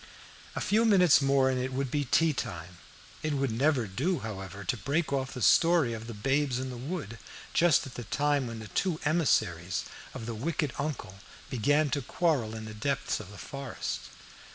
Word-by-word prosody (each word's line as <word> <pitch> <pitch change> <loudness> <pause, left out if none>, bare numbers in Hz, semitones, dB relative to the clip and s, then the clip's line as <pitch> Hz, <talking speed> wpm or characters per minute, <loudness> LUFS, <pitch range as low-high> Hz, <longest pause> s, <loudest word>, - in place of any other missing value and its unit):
A - - -2
few 215 +3 +3
minutes 180 -10 +6
more 135 -1 +3
and 130 -1 0
it 130 +1 -2
would 135 -1 -2
be 145 -1 0
tea 160 +5 +3
time. 90 - -6 0.4
It 155 -1 -1
would 135 -3 0
never 130 +1 +2
do, 140 - -1
however, 100 -2 -6
to 90 - 0
break 145 +6 -1
off 130 -1 -1
the 125 - -3
story 165 -8 +5
of 115 0 -6
the 115 - -6
Babes 135 +4 +1
in 130 0 -3
the - - -6
Wood 120 - -5 0.3
just 170 -3 +4
at 135 - -9
the 120 - -7
time 145 +2 +1
when 115 -1 -6
the 110 -1 -8
two 175 - 0
emissaries 105 - +1 0.3
of 115 - -6
the 115 - -4
wicked 145 +4 -2
uncle 140 -10 -4 0.3
began 145 +5 +2
to 145 - 0
quarrel 135 -6 0
in 110 0 -6
the 110 - -7
depths 135 +6 -1
of 105 -3 -9
the 100 - -11
forest. 135 +1 -5
130 Hz, 195 wpm, -29 LUFS, 110-150 Hz, 0.4 s, minutes